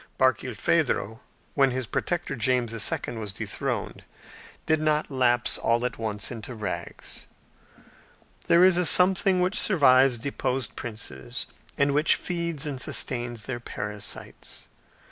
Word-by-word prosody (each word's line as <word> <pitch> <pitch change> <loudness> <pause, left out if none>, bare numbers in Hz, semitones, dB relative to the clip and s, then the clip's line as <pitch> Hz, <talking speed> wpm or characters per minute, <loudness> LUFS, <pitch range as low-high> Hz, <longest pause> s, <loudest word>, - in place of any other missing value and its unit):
Barkilphedro, 130 -2 +1 0.3
when 135 -2 +4
his 130 0 -3
protector, 170 +4 -2
James 125 -1 +1
II., 115 +1 -1
was 105 -3 -4
dethroned, 95 - -4 0.6
did 155 -1 +2
not 155 -1 +1
lapse 120 -2 +1
all 120 +1 +1
at 125 - -4
once 105 -1 -2
into 120 +1 -7
rags. 90 -5 -5 1.2
There 170 +1 +6
is 185 -1 +6
a 180 - +2
something 185 +2 +5
which 180 +2 +1
survives 135 - +5
deposed 125 -2 -3
princes, 105 - -6 0.3
and 140 0 +2
which 150 +3 +4
feeds 170 -4 -3
and 140 -4 -3
sustains 120 -4 0
their 125 -2 -4
parasites. 105 -3 -6
130 Hz, 125 wpm, -26 LUFS, 115-150 Hz, 1.2 s, There